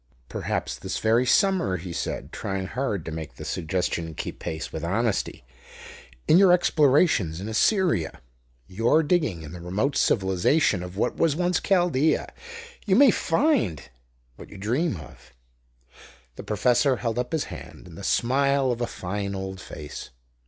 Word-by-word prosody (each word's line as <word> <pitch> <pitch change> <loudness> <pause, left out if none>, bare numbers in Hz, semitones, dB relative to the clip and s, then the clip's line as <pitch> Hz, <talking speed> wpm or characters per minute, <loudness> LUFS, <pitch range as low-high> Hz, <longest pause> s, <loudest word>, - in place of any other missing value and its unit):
"Perhaps - - -3
this - - -4
very 115 +3 +2
summer," 190 - +3
he 90 0 -7
said, - - -4
trying 95 -1 -3
hard 105 - -3
to 80 - -5
make 80 -6 -7
the - - -9
suggestion 85 -1 -2
keep - - -6
pace 80 0 -5
with 80 - -5
honesty; 100 - -1 0.8
"in 165 - +6
your 195 -2 +6
explorations 145 - +3
in 100 - -5
Assyria 155 - +1 0.5
your 115 - +2
digging 145 - 0
in 75 - -9
the 85 0 -9
remote 105 +11 -1
civilization 95 - +2
of 90 +1 -8
what - - 0
was 160 -3 +2
once 180 +2 +1
Chaldea, 175 -6 +1 0.5
you 190 - +4
may 265 +1 +7
find 185 - 0 0.5
what - - -12
you 105 - -11
dream 120 - 0
of 65 -4 -14 0.5
" - - -22
The - - -7
professor 125 +5 +2
held 115 -1 -2
up 125 0 -3
his 160 -2 0
hand, - - -11
and 85 -2 -12
the 100 - -9
smile 135 +4 +2
of 120 0 -3
a 120 - 0
fine 100 +1 -4
old 95 0 -5
face. 75 -1 -8
110 Hz, 160 wpm, -25 LUFS, 90-145 Hz, 0.8 s, may